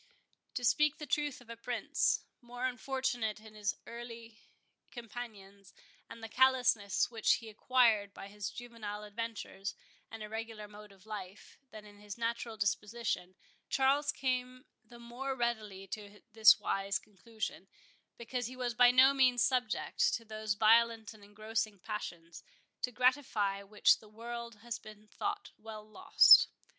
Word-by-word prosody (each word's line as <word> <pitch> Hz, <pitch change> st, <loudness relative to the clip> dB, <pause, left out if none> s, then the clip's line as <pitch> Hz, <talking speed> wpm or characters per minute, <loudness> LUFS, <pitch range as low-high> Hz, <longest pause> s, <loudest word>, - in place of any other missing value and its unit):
To 250 Hz, -, -3 dB
speak 300 Hz, +4 st, +3 dB
the 305 Hz, -, -7 dB
truth 290 Hz, -2 st, -1 dB
of 240 Hz, -, -18 dB
a -, -, -6 dB
prince, 240 Hz, +1 st, 0 dB, 0.2 s
more 245 Hz, +1 st, -5 dB
unfortunate 255 Hz, -4 st, -2 dB
in 215 Hz, 0 st, -14 dB
his 210 Hz, -1 st, -2 dB
early 230 Hz, -1 st, -9 dB, 0.5 s
companions, 205 Hz, -5 st, -10 dB, 0.3 s
and 230 Hz, -, -11 dB
the -, -, -4 dB
callousness 250 Hz, -5 st, +3 dB
which 225 Hz, -2 st, +3 dB
he 225 Hz, -, -4 dB
acquired 220 Hz, -2 st, +2 dB
by 195 Hz, -, -10 dB
his 205 Hz, 0 st, -5 dB
juvenile 220 Hz, -4 st, -7 dB
adventures 210 Hz, -2 st, -5 dB, 0.3 s
and 225 Hz, -1 st, -8 dB
irregular 220 Hz, 0 st, -6 dB
mode 210 Hz, 0 st, -13 dB
of 195 Hz, 0 st, -20 dB
life, 210 Hz, -2 st, -9 dB
than 215 Hz, -2 st, -11 dB
in 205 Hz, -1 st, -15 dB
his 205 Hz, 0 st, -9 dB
natural 230 Hz, -1 st, -3 dB
disposition, 205 Hz, -2 st, -2 dB, 0.3 s
Charles 280 Hz, +2 st, +2 dB
came 255 Hz, -1 st, -2 dB, 0.2 s
the 235 Hz, +2 st, -15 dB
more 245 Hz, +3 st, -5 dB
readily 220 Hz, -6 st, -2 dB
to 205 Hz, 0 st, -8 dB
this 220 Hz, -1 st, +8 dB
wise 195 Hz, +1 st, -1 dB
conclusion, 210 Hz, -2 st, -7 dB, 0.5 s
because 240 Hz, +1 st, -4 dB
he 255 Hz, -, -9 dB
was 250 Hz, -2 st, -2 dB
by 245 Hz, +1 st, +7 dB
no 260 Hz, +2 st, +6 dB
means 255 Hz, -3 st, +4 dB
subject 250 Hz, -4 st, +1 dB
to 230 Hz, -, -7 dB
those 215 Hz, -1 st, -3 dB
violent 225 Hz, +1 st, +4 dB
and 215 Hz, -2 st, -17 dB
engrossing 215 Hz, +1 st, -3 dB
passions, 175 Hz, -5 st, -7 dB, 0.4 s
to 250 Hz, -, -1 dB
gratify 240 Hz, -6 st, +1 dB
which 205 Hz, +1 st, +3 dB
the 215 Hz, -, -17 dB
world 235 Hz, +1 st, -7 dB
has 235 Hz, -1 st, -4 dB
been 215 Hz, 0 st, -14 dB
thought 410 Hz, -, -4 dB
well 215 Hz, -1 st, -9 dB
lost. 215 Hz, -, +7 dB
225 Hz, 145 wpm, -33 LUFS, 210-245 Hz, 0.5 s, this